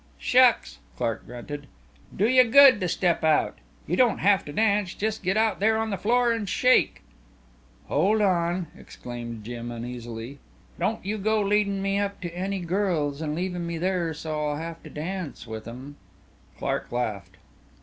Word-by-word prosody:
"Shucks!" 250 -1 +3 0.2
Clark 115 -2 -2
grunted. 140 +4 -8 0.5
"Do 205 - +3
you 255 +1 +6
good 260 -1 +7
to 180 - 0
step 175 -1 0
out. 155 -1 +2 0.3
You 175 - -1
don't 245 0 +3
have 200 0 +3
to 145 - -7
dance 200 +1 +1
just 220 +1 -2
get 190 +3 0
out 220 -3 +2
there 220 +2 +3
on 220 0 -1
the - - 0
floor 240 +5 +2
and 215 -4 -3
shake." 255 +6 +3 0.8
"Hold 195 +9 +2
on," 175 -3 +1
exclaimed 120 -2 -8
Jim 120 +1 -6
uneasily, 120 +2 -7 0.4
"Don't 195 +3 -1
you 210 +2 -2
go 215 +2 +1
leadin' 200 -1 +1
me 195 0 0
up 200 0 -2
to 175 -1 -6
any 190 +1 -2
girls 170 -5 -1
and 150 -1 -2
leavin' 180 0 -3
me 170 0 -3
there 175 -1 0
so 150 0 -3
I'll 145 - -2
have 165 +1 -6
to - - -11
dance 170 -1 -5
with 110 -1 -7
'em." 130 +5 -9 0.6
Clark - - -3
laughed. 100 -6 -3
180 Hz, 170 wpm, -26 LUFS, 145-205 Hz, 0.8 s, good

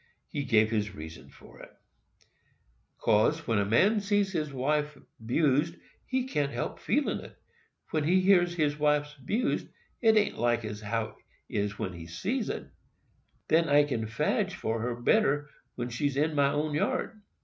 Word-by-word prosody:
He 145 - -3
gave 110 -3 +3
this 105 -3 -1
reason 80 0 -9
for - - -16
it: - - -11 1.3
"'Cause, 115 +9 +2
when 115 -3 +1
a 100 - +1
man 195 - +4
sees 205 -1 +1
his 155 -5 -2
wife 150 +3 -1 0.3
'bused, 150 +6 +2 0.3
he 260 -1 0
can't 145 - -1
help 120 - -4
feelin' 280 +7 0
it. - - -12 0.5
When 155 -2 +1
he 180 +4 +4
hears 175 -2 +4
his 150 -2 0
wife's 150 0 +2
'bused, 205 - -1 0.3
't 220 -2 +5
an't 210 - +1
like 120 -1 +1
as 105 0 -6
how 110 0 -3 0.3
it - - -8
is 100 0 -1
when 95 - -3
he 85 -1 -9
sees 210 - -2
it. - - -4 0.8
Then 165 +1 +3
I 145 +1 +6
can 120 -6 -2
fadge 115 +1 0
for 110 0 -2
her 120 +1 -2
better 145 - +3
than 145 - -20 0.3
when 120 0 -3
she's 135 +3 -1
in 155 +2 +1
my 140 -1 +3
own 150 +1 -1
yard." 210 +8 -1
145 Hz, 170 wpm, -29 LUFS, 115-165 Hz, 1.3 s, I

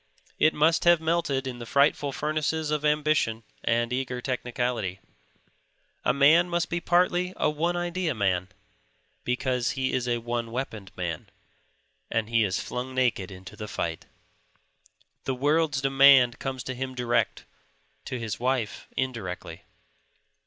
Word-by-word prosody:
It 155 - +4
must 160 +2 +3
have 175 -1 +6
melted 160 -4 0
in 125 -2 -5
the 120 - -6
frightful 140 +1 +2
furnaces 155 +2 -1
of 150 -1 0
ambition 150 -7 +1 0.2
and 120 +1 +1
eager 125 -1 -2
technicality. 120 -6 -2 1.0
A - - +3
man 155 +6 +5
must 175 -1 -1
be 170 - 0
partly 180 +1 +2
a 155 - +2
one 165 +4 0
idead 175 -4 -1
man, 95 -3 +1 0.8
because 125 -1 0
he 130 0 0
is 125 -1 0
a 120 -1 +1
one 120 0 -3
weaponed 110 -6 -5
man 85 -4 -4 0.8
and 115 -1 -1
he 115 -1 +4
is 95 -3 0
flung 130 +1 -5
naked 120 -7 +1
into 95 +2 -11
the 105 0 -7
fight. 85 -5 -4 1.2
The 135 - -1
world's 145 +1 +1
demand 135 -3 +6
comes 130 -2 -4
to 130 - -4
him 130 +1 -5
direct; 120 -1 0 0.6
to 125 - -4
his 115 -4 -4
wife 125 -3 -1
indirectly. 115 -9 -4
130 Hz, 140 wpm, -27 LUFS, 115-150 Hz, 1.2 s, have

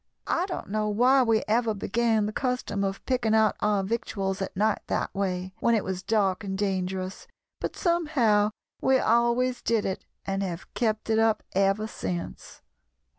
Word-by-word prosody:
"I 355 +2 0
don't 360 - -5
know 215 +1 0
why 250 +6 +4
we 225 -3 +2
ever 225 0 +2
began 225 +1 +1
the 210 - -2
custom 250 -6 -1
of 195 0 -3
picking 245 -4 +1
out 220 -2 +4
our 205 -2 +1
victuals 195 -2 -2
at 190 - -4
night 215 +2 +2
that - - -1
way, 185 -1 -2
when 235 - +3
it 215 - +1
was 185 -1 -3
dark 195 -1 +1
and 190 -1 -3
dangerous, 190 -1 -2 0.3
but - - -3
somehow 280 - +2 0.3
we 265 0 +4
always 240 +1 +2
did 225 -3 +1
it, 190 - -3 0.2
and 195 0 -1
have 180 -2 -5
kept 220 -2 -1
it 220 - +3
up 225 -1 +2
ever 195 +2 +2
since." 180 -5 -6
215 Hz, 170 wpm, -27 LUFS, 195-235 Hz, 0.3 s, why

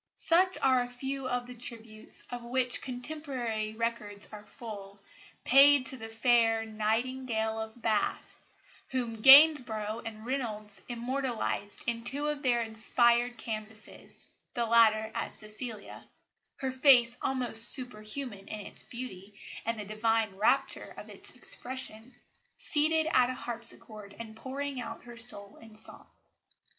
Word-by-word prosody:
Such 370 +3 +3
are 260 -2 +4
a 245 - -4
few 265 +1 -4
of 245 -1 -1
the 250 - -9
tributes, 230 -2 -6
of 245 0 -5
which 245 +1 -1
contemporary 245 -5 -4
records 220 -3 -3
are 210 -1 -11
full, 200 -4 -9 0.4
paid 275 +1 +7
to 265 - -7
the 225 -2 -7
fair 225 -1 +2
"Nightingale 220 +1 -1
of 220 +2 -7
Bath," 215 -2 -1 0.5
whom 245 -3 -2
Gainsborough 250 -6 +7
and 220 -1 -8
Reynolds 220 -6 -3
immortalised 240 -4 -3
in 230 -1 -2
two 285 +5 -1
of 295 -1 -3
their 240 -4 +2
inspired 235 +2 +2
canvases 220 -1 -8 0.2
the 235 - 0
latter 220 -1 +4
as - - -3
Cecilia 215 0 -7 0.5
her 265 -1 -2
face 255 -3 +5
almost 245 -3 +2
superhuman 215 -3 -1
in 215 - -6
its - - -8
beauty 210 -5 -9 0.3
and 230 -1 -1
the 210 - -5
divine 215 -1 0
rapture 265 +7 +1
of - - -10
its - - -5
expression 250 -2 -5 0.4
seated 315 +1 +1
at 250 0 +4
a 255 - -3
harpsichord 225 -4 -5
and 220 -1 -8
pouring 270 +2 -4
out - - -7
her 240 0 -11
soul 210 -4 -9
in 225 -1 -15
song. 215 - -13
235 Hz, 135 wpm, -30 LUFS, 220-255 Hz, 0.5 s, paid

